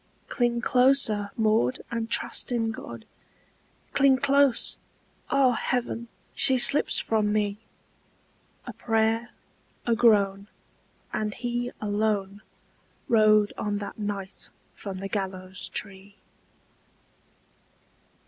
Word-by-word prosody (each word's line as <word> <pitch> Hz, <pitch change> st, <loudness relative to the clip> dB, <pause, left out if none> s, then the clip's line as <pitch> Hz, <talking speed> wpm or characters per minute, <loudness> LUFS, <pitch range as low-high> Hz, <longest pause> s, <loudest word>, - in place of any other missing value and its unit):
"Cling 240 Hz, -1 st, 0 dB
closer, 250 Hz, -5 st, +2 dB
Maud, 215 Hz, -, +1 dB
and 230 Hz, -1 st, -3 dB
trust 230 Hz, -, +1 dB
in 225 Hz, -2 st, 0 dB
God! 115 Hz, -, -9 dB, 0.9 s
Cling 275 Hz, -1 st, +4 dB
close! 280 Hz, -1 st, +2 dB, 0.5 s
Ah, 275 Hz, -2 st, +3 dB
heaven, 235 Hz, -1 st, -2 dB, 0.3 s
she 260 Hz, -, +4 dB
slips 280 Hz, +4 st, +5 dB
from 215 Hz, -2 st, 0 dB
me!" 210 Hz, -1 st, -1 dB, 1.1 s
A -, -, -7 dB
prayer, 225 Hz, +1 st, 0 dB, 0.6 s
a 235 Hz, -, +2 dB
groan, 200 Hz, -4 st, +2 dB, 0.7 s
and 210 Hz, -1 st, -2 dB
he 245 Hz, 0 st, -3 dB
alone 205 Hz, -1 st, -2 dB, 0.7 s
Rode 215 Hz, -2 st, +4 dB
on 205 Hz, -1 st, -2 dB
that 205 Hz, +1 st, -7 dB
night 205 Hz, -2 st, -5 dB, 0.2 s
from 195 Hz, -2 st, -8 dB
the 195 Hz, -, -4 dB
gallows 190 Hz, -1 st, -4 dB
tree. 200 Hz, 0 st, -5 dB
215 Hz, 100 wpm, -26 LUFS, 205-240 Hz, 1.1 s, slips